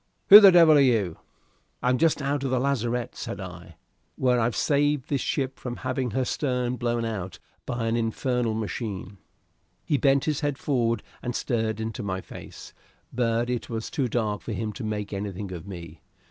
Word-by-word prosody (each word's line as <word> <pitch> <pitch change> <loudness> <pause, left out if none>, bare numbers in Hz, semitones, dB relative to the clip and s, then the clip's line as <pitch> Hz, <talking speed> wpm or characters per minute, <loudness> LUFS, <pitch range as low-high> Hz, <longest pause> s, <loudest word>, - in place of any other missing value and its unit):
who 205 - +13
the 200 -2 +9
devil 165 -3 +7
are - - +6
you?" 110 - +2 0.6
"I'm 125 0 +2
just 160 -3 +2
out 140 0 -1
of 135 - -1
your 130 0 +1
lazarette," 125 -3 -1
said - - -6
I, - - -9 0.4
"where 125 -2 +2
I've 115 +1 0
saved 145 -1 +1
this 140 -2 0
ship 135 -2 -2
from 120 -1 -5
having 130 0 -2
her 130 +4 -1
stern 125 -2 -1
blown 120 0 -1
out 95 -5 -4 0.3
by 120 -2 -2
an 115 0 0
infernal 120 0 -1
machine!" 105 -3 -5 0.7
He 145 - +1
bent 135 -1 +3
his 150 -3 0
head 145 -2 -1
forward 120 -7 0 0.2
and 120 -1 -4
stared 110 -3 -1
into 110 +1 -4
my 95 -2 -3
face, - - -11 0.4
but 120 -1 0
it 125 -1 -3
was 115 -1 -4
too 135 -4 0
dark 105 -5 -1
for - - -5
him 110 -2 -3
to 125 - -7
make 105 -1 -4
anything 100 -1 -5
of 90 0 -8
me. 85 -4 -9
120 Hz, 185 wpm, -26 LUFS, 110-135 Hz, 0.7 s, who